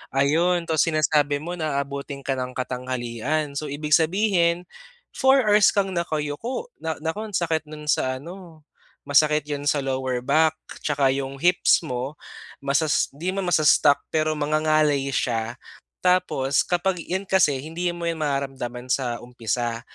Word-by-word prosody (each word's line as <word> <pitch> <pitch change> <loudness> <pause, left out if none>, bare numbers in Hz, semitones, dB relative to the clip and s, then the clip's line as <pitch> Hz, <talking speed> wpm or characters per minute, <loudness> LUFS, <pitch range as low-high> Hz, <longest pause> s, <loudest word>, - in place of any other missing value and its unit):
Ayun, 165 +6 +2
tapos 160 -2 +1
sinasabi 150 -2 +1
mo 175 +2 -5
na 155 -3 -1
aabutin 140 0 -7
ka 135 - -2
ng 125 0 -5
katanghalian. 130 +3 -3
So, 155 - -5
ibig 150 +2 -5
sabihin 170 +1 +3 0.5
4 265 0 +4
hours 210 -1 +5
kang 195 -1 +1
nakayuko, 170 - -3
na 160 -1 -3
naku 190 +7 -3
ang 205 - -6
sakit 160 -3 0
nun 150 0 -9
sa 130 0 0
ano, 165 +2 -11 0.4
masakit 150 +1 +3
'yun 145 0 -3
sa 145 -1 +2
lower 130 -2 -2
back 160 +4 +3 0.3
'Tsaka 140 -3 +2
'yong 135 0 -4
hips 180 0 +4
mo 130 -1 -4 0.5
masas 140 +2 +1
'di 175 +6 -3
naman 195 -2 -2
masas-stuck 150 -3 +5 0.2
pero 155 0 +1
mangangalay 155 -1 +2
siya. 115 -1 -1 0.5
Tapos, 180 -7 +2
kapag 180 +1 0
'yon 190 +4 -3
kasi 180 -8 +3
hindi 165 +5 -5
mo 170 0 -5
'yon 165 -1 -1
mararamdaman 135 -4 -3
sa 125 -3 0
umpisa. 120 -1 -3
150 Hz, 145 wpm, -24 LUFS, 135-170 Hz, 0.5 s, hours